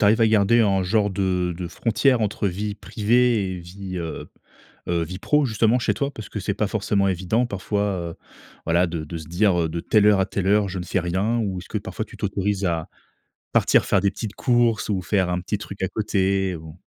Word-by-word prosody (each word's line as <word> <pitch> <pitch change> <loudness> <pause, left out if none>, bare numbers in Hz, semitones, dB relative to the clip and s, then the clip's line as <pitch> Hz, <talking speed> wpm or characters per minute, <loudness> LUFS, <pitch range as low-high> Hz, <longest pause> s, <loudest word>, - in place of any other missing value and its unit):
tu - - +3
arrives 110 +3 +4
à 115 - +6
garder 110 +2 +4
un 95 -3 +3
genre 105 +3 +2
de 90 -3 -1
de 90 -1 -5
frontière 120 +5 +1
entre 105 -1 0
vie 100 +3 -3
privée 110 -1 +1
et 90 - -5
vie, 95 +2 -8
heu 80 -1 -5 0.6
heu, 85 -1 +1
vie 90 +3 -7
pro 150 +7 +2
justement 115 +1 +2
chez - - +1
toi 140 0 -2
parce 110 -5 -9
que 105 - -5
c'est 100 +1 -2
pas 105 0 -1
forcément 100 -1 +1
évident 95 +6 0
parfois, 100 -1 -2 0.3
heu, - - -11 0.5
voilà 85 +2 +3
de 85 -2 -4
de 80 +2 -6
se 80 - -9
dire, 90 +2 +2
heu: 80 - 0
«de 85 +1 -4
telle 105 -2 +3
heure 105 -2 +5
à - - +2
telle 95 -1 -3
heure, 105 0 +3
je 95 0 -4
ne 90 - -5
fais 95 - 0
rien», 95 +7 0
ou 100 -4 -2
est-ce 90 - -11
que - - -3
parfois - - -5
tu - - -14
t'autorise 100 0 -1
à 85 -3 -1 0.7
partir - - +4
faire 100 - +2
des 100 +1 +2
petites 105 0 -6
courses 120 -3 +2
ou 95 -3 -1
faire 95 +1 +1
un 90 0 0
petit 100 +3 -3
truc 100 -1 -8
à 95 - +1
côté 95 -3 0
ou? 80 0 -11
100 Hz, 230 wpm, -23 LUFS, 90-110 Hz, 0.7 s, à